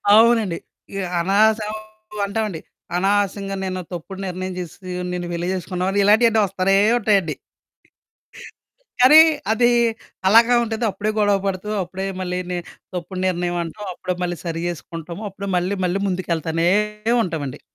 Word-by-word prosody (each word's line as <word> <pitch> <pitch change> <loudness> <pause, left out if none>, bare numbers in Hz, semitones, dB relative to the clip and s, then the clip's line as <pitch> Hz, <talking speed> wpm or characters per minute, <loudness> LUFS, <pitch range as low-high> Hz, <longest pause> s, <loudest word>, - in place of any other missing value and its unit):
అవునండి. 225 -6 +4 0.4
ఇ - - -3 0.2
అనవసరం 210 +4 +2 0.5
అంటావండి. 200 -4 -2 0.4
అనవసరంగా 195 +1 0
నేనో 185 -1 -3
తప్పుడు 190 +3 -7
నిర్ణయం 185 +1 -4
జేసేసీ, 180 +1 -8 0.2
నిన్ను 175 -1 -3
పెళ్లి 170 +1 -2
చేసుకున్నావని, 185 +2 -2
ఇలాంటియన్నీ 220 +1 +5
వస్తానే 195 0 +1 0.2
ఉంటాయండి. 200 -7 +2 1.7
కానీ, 265 +5 +9 0.3
అదీ 240 +2 +3 0.6
అలాగా 230 +3 +6
ఉంటంది. 225 +1 -3
అప్పుడే 205 +3 -2
గొడవ 205 -1 +3
పడుతూ, 195 +2 -3
అప్పుడే 190 +2 -5
మళ్ళీని 180 0 -3 0.4
తప్పుడు 180 +2 -5
నిర్ణయవంటాం, 175 +2 -2
అప్పుడే 180 +1 -3
మళ్ళీ 175 -1 -2
సరి 165 0 -3
చేసుకుంటాము. 170 +2 -7
అప్పుడే 200 +1 -7
మళ్ళీ 185 +3 0
మళ్ళీ 180 +2 0
ముందుకెళ్తానే 170 -2 -1 0.5
ఉంటావండి. 155 - -4
185 Hz, 120 wpm, -21 LUFS, 175-205 Hz, 1.7 s, కానీ